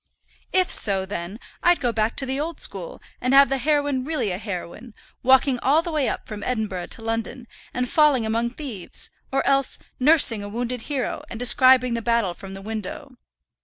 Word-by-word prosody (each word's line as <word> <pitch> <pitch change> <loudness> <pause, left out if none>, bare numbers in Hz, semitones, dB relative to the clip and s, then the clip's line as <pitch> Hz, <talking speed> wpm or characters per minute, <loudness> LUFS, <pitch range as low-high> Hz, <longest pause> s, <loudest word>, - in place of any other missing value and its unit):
"If 370 -1 +2
so, 195 -3 +3
then, 190 +2 -6 0.2
I'd 350 0 +4
go 245 -3 0
back 220 0 -1
to 270 - 0
the 265 +1 -3
old 320 +3 -4
school, - - -4 0.2
and 255 +2 +2
have 275 -2 +7
the 270 0 0
heroine 290 -1 0
really 295 -8 -2
a 180 - -4
heroine, 210 +3 -7 0.3
walking 260 0 +4
all 295 +7 +2
the 340 - -4
way 300 -4 0
up - - -5
from 210 -1 -7
Edinburgh 210 -7 -3
to 225 - -9
London, 225 +2 -4 0.2
and 250 0 -2
falling 290 -5 +3
among 230 +2 -1
thieves; 240 - -5 0.2
or 270 - 0
else 275 -1 +2 0.2
nursing 260 -6 +5
a 205 - -7
wounded 245 +2 -4
hero, 275 -4 -2
and 230 - -7
describing 250 0 +5
the 230 - -2
battle 230 -5 +1
from 195 +2 -10
the 195 - -10
window. 225 +6 -6
245 Hz, 190 wpm, -23 LUFS, 220-275 Hz, 0.3 s, have